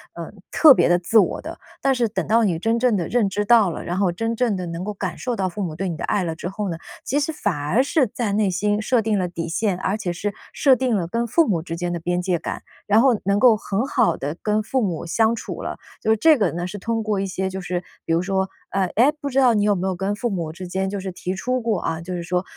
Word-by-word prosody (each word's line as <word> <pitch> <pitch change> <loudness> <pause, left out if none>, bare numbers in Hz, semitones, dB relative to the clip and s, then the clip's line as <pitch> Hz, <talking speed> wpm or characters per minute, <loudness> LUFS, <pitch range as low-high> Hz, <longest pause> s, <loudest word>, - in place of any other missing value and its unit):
呃， 170 -1 -7 0.2
特 310 -3 +8
别 - - +3
的 175 0 +4
自 180 +6 +1
我 215 - +3
的。 - - -8 0.2
但 270 -1 +2
是 240 -3 +1
等 210 - -3
到 230 +1 +4
你 175 -6 +1
真 225 +5 +1
正 235 -3 +2
地 170 - -2
认 230 -5 +1
知 205 +2 -2
到 220 -3 +5
了， 165 - -5
然 175 - -2
后 190 -2 +2
真 225 +6 -2
正 230 -4 +1
地 180 - -4
能 170 +1 -5
够 210 +2 -4
感 190 -2 -4
受 250 - -3
到 190 -1 0
父 200 +3 -4
母 160 -4 -5
对 195 - -2
你 170 - -3
的 - - -7
爱 200 - 0
了 165 -1 -3
之 175 - -5
后 205 +2 -4
呢， 165 - -3 0.3
其 290 +2 0
实 290 - -1
反 205 - -2
而 150 - +1
是 280 +1 +2
在 215 -1 -3
内 205 -1 +2
心 205 +3 0
设 235 +2 +2
定 215 -1 0
了 180 -2 -1
底 170 -1 -4
线， 185 +2 -1
而 195 +3 -1
且 185 -5 -3
是 200 +4 -3 0.2
设 275 -3 +4
定 255 -1 0
了 185 -6 0
跟 230 +6 -1
父 310 +8 +3
母 175 -6 +1
之 165 0 -6
间 175 0 -2
的 170 - -4
边 175 +1 -1
界 180 -1 0
感， 165 - -6 0.2
然 210 +2 +4
后 250 -3 +4
能 200 +1 +1
够 240 -1 +6
很 210 +3 -2
好 170 -9 +2
地 145 +3 -4
跟 210 0 +1
父 255 +5 -1
母 175 -8 -2
相 220 +7 +2
处 235 - -6
了。 - - -5 0.2
就 220 - +1
是 220 - +3
这 310 +7 +5
个 200 -7 +1
呢， 175 +1 -3
是 205 - -7
通 225 +2 -2
过 210 -2 -1
一 195 - -1
些 190 0 -2
就 190 0 -5
是， 180 0 -3 0.2
比 - - -3
如 165 - +2
说 190 0 0 0.2
呃， 195 -1 +1
诶， 250 +7 +5
不 285 - -2
知 265 - -3
道 255 -3 +5
你 210 - +2
有 205 -1 +3
没 185 +1 -2
有 190 - -1
跟 195 +3 -2
父 240 +3 -2
母 170 -5 -3
之 185 +2 -8
间 190 +2 -2
就 200 0 -3
是 190 0 -5
提 180 +1 -4
出 255 +6 -1
过 225 -5 0
啊， 165 0 -2
就 180 +2 -5
是 175 - -4
说， 180 +1 -1
200 Hz, 315 characters per minute, -22 LUFS, 180-225 Hz, 0.3 s, 特